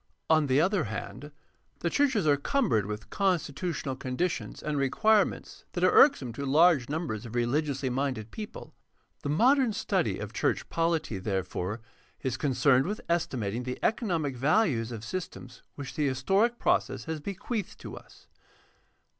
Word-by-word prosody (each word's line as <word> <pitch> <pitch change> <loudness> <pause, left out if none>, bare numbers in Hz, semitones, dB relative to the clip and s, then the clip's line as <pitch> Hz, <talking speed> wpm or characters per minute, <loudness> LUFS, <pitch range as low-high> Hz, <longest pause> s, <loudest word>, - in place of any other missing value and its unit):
On 155 -2 +4
the 130 +1 +3
other 185 0 +2
hand, 110 +7 -6 0.5
the 170 - 0
churches 260 - +2
are 145 -2 +5
cumbered 135 - +1
with 105 +1 -6
constitutional 170 -6 -1
con 130 -1 -5
ditions 180 0 -2
and 150 -1 -2
requirements 205 - +1
that 175 - -2
are 185 - +5
irksome 135 - +5
to 140 - -5
large 145 -1 +4
numbers 150 -9 -3
of 120 -1 -8
religiously 135 +3 0
minded 130 -4 -2
people. 215 -1 -8 0.5
The 145 - -4
modern 245 - +4
study 205 - 0
of - - -6
church - - 0
polity, 165 - 0
therefore, 95 +1 -3 0.4
is 130 -2 -1
concerned 130 0 +2
with 210 +2 -3
estimating 125 -10 -1
the 125 0 -4
economic 170 - 0
values 130 - +2
of 115 -1 -6
systems 130 -7 -6
which 140 -2 -7
the 150 -2 0
historic 195 - +1
process - - 0
has 160 -1 -4
bequeathed 200 +6 -4
to - - -7
us. - - -15
145 Hz, 150 wpm, -28 LUFS, 125-180 Hz, 0.5 s, are